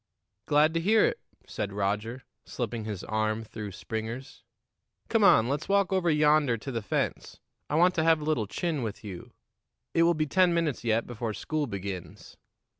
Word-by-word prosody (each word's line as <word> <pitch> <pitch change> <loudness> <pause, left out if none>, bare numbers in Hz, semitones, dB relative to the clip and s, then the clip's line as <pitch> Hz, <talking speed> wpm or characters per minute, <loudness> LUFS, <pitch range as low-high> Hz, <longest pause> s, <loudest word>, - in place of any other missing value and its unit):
"Glad 150 +2 +4
to 165 - +1
hear 215 +6 +4
it," - - -1 0.3
said 100 - -4
Roger, 105 +5 -2 0.2
slipping 115 -3 -4
his 105 -4 -5
arm 110 +1 -1
through 105 -2 -7
Springer's. 110 +6 -6 0.7
"Come 225 -2 +3
on, 115 - +6
let's 145 +6 -2
walk 200 -1 +2
over 185 -2 +2
yonder 150 -5 +3
to 135 +5 -6
the 115 -2 -2
fence. 105 - -3 0.3
I 150 - -1
want 180 +3 +5
to 160 - +1
have 165 -1 +4
a - - -6
little 125 -9 0
chin 160 - -2
with 110 -3 -5
you. 95 -4 -8 0.6
It 165 - +3
will 170 +1 +4
be 155 0 0
ten 180 +3 +3
minutes 160 -8 -1
yet 115 0 +1
before 115 -2 -4
school 150 +7 -2
begins." 100 -4 -7
125 Hz, 180 wpm, -28 LUFS, 110-160 Hz, 0.7 s, on